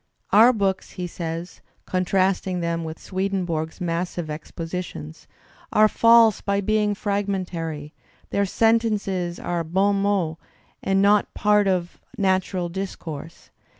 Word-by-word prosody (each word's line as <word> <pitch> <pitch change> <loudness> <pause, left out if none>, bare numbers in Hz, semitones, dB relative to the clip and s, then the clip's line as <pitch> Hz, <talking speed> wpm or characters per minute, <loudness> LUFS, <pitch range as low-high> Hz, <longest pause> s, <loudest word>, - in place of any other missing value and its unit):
"Our 225 +4 +7
books," 195 -5 -1
he 180 - -4
says, 170 0 -6 0.2
con 185 0 -1
trasting 185 -1 +1
them 170 -1 -1
with 160 0 -6
Swedenborg's 185 -4 -2
massive 175 -2 -2
expositions, 165 - -6 0.4
"are 215 0 +6
false 230 0 +5
by 200 0 0
being 210 +1 +1
fragmentary; 185 -7 -3 0.4
their 200 0 +1
sentences 205 -5 +1
are 175 -1 -2
bon 195 +4 +1
mots 185 -6 0 0.4
and 195 0 +2
not 205 +1 +3
parts 210 -1 +3
of 180 -2 -2 0.2
natural 190 -2 +1
discourse." 170 -4 -7
185 Hz, 115 wpm, -23 LUFS, 170-200 Hz, 0.4 s, Our